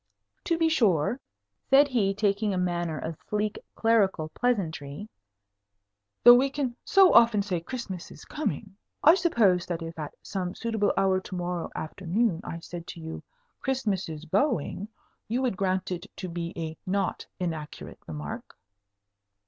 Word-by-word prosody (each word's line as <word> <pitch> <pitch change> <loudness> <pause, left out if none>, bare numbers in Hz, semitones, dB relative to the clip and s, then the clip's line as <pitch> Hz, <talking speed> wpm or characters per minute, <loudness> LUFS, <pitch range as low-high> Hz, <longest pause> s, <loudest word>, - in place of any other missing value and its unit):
"To 335 - +1
be 330 -1 +3
sure," 225 - +2 0.5
said 280 +2 +7
he, 220 -7 +2
taking 205 0 +1
a - - -1
manner 175 -3 -1
of 160 0 -5
sleek 210 0 -1 0.2
clerical 200 -8 +2
pleasantry, 180 -6 -2 1.2
"though 240 - +11
we 260 +3 +4
can 270 -3 -2
so 385 -2 +6
often 230 -3 +6
say 185 -4 -2
'Christmas 195 -4 -6
is - - -13
coming,' 230 -10 -4 0.3
I 320 - +9
suppose 220 - +3
that 170 -2 -3
if 165 0 -7
at 150 -2 -6
some 185 -2 -3
suitable 225 -3 0
hour 190 -1 +3
to 185 0 -8
morrow 175 -1 -3
afternoon 180 +3 -1
I 165 -4 -6
said 170 0 -8
to - - -8
you, 160 0 -6 0.4
'Christmas 225 -10 -1
is 155 0 -7
going,' 200 - 0 0.4
you 235 +3 0
would 245 -6 +1
grant 185 -1 -1
it 180 +2 -4
to 185 - -5
be 170 -1 -4
a 160 -1 -4
not 195 -1 -1
inaccurate 160 -4 -5
remark?" 75 -1 -7
190 Hz, 150 wpm, -27 LUFS, 170-230 Hz, 1.2 s, though